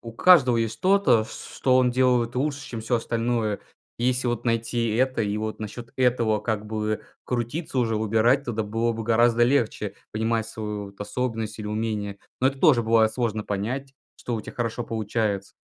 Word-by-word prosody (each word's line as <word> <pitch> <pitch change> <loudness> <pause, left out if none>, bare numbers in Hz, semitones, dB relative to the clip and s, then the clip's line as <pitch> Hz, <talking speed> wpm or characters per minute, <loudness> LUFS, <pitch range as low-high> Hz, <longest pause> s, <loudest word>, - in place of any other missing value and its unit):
У 115 -1 -9
каждого 130 -4 +6
есть 115 -1 0
что-то, 150 - +3
ч 110 - -12
ч - - -9
что 130 -1 +3
он 125 -1 +4
делает 125 -2 +2
лучше, 145 +1 -1
чем 115 -2 -5
всё 120 +2 0
остальное. 115 -2 -1 0.4
И 120 - -2
если 125 0 +1
вот 120 0 -2
найти 115 -1 0
это 130 0 +1
и 105 0 -1
вот 110 0 -3
насчет 115 +2 -7
этого 120 -4 +2
как 105 -1 -2
бы 110 0 -2 0.2
крутиться 125 +4 -2
уже, 115 -3 +1
выбирать, 115 +6 +2
тогда 110 -2 -2
было 115 +3 0
бы 115 0 -5
гораздо 120 +1 +3
легче 120 -2 +1 0.2
понимать 110 +1 0
свою 105 -2 -5
вот 100 - -13
способность 110 +1 -3
или 105 - -5
умение. 105 -2 -3 0.2
Но 130 - +4
это 135 0 0
тоже 135 -8 +5
бывает 110 -1 +3
сложно 110 -3 -2
понять, 125 +7 -3 0.2
что 120 - -4
у - - -3
тя - - -9
хорошо 120 0 -3
получается. 105 -3 -2
115 Hz, 190 wpm, -25 LUFS, 110-125 Hz, 0.4 s, каждого